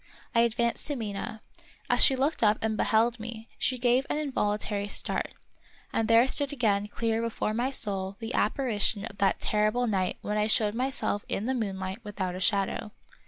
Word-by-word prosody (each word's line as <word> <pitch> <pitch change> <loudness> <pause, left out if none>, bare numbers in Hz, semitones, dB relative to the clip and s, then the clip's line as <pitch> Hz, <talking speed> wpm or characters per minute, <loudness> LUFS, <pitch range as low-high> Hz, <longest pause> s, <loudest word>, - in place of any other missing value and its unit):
I 230 - +3
advanced 235 0 +1
to 290 - -1
Mina. 215 -1 -5 0.4
As - - +4
she 270 - +6
looked 275 +5 0
up 215 -1 +4
and 220 -1 0
beheld 230 +2 +2
me, 225 0 -7
she 255 - 0
gave 250 +2 +2
an - - 0
involuntary 210 -7 -1
start, - - 0 0.6
and 225 - +1
there 230 +3 +5
stood 285 +1 +4
again 210 -7 +1
clear 225 +1 -1
before 230 -2 -2
my 240 +4 0
soul 195 -6 -1
the 225 +1 -5
apparition 215 -3 0
of 200 -3 -10
that 195 -1 +2
terri 210 0 +1
ble 245 +2 0
night 190 -5 0
when 210 0 -2
I 210 - +2
showed 215 -1 +2
myself 250 -4 -1
in 205 - -1
the 260 - 0
moonlight 190 -4 -3
without 195 -3 -4
a 185 - -5
shadow. 200 +1 0
220 Hz, 185 wpm, -28 LUFS, 205-240 Hz, 0.6 s, she